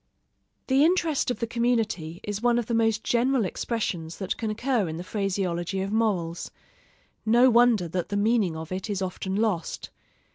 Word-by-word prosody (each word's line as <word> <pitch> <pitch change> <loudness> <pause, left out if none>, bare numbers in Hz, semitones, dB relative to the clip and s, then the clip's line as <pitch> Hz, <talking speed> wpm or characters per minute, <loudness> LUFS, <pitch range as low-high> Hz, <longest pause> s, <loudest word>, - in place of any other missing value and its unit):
The 270 +2 +4
interest 330 -5 +2
of 245 - -1
the 230 - -1
community 225 -9 -1
is 205 0 -4
one 240 0 +3
of 240 - 0
the 235 - -3
most 225 -1 +2
general 245 -1 +2
expressions 180 -6 -3
that 190 -2 -2
can 225 - -3
occur 225 -3 0
in 160 - -5
the 175 - -5
phraseology 190 -2 -2
of 195 +1 -3
morals: 190 -7 0 0.7
no 240 +3 +5
wonder 235 -6 +4
that 175 +1 -3
the 205 - -1
meaning 205 -5 +2
of 160 +1 -7
it 190 +3 -4
is 195 -2 -1
often 190 +1 -3
lost. 205 -6 -1
215 Hz, 175 wpm, -26 LUFS, 185-235 Hz, 0.7 s, no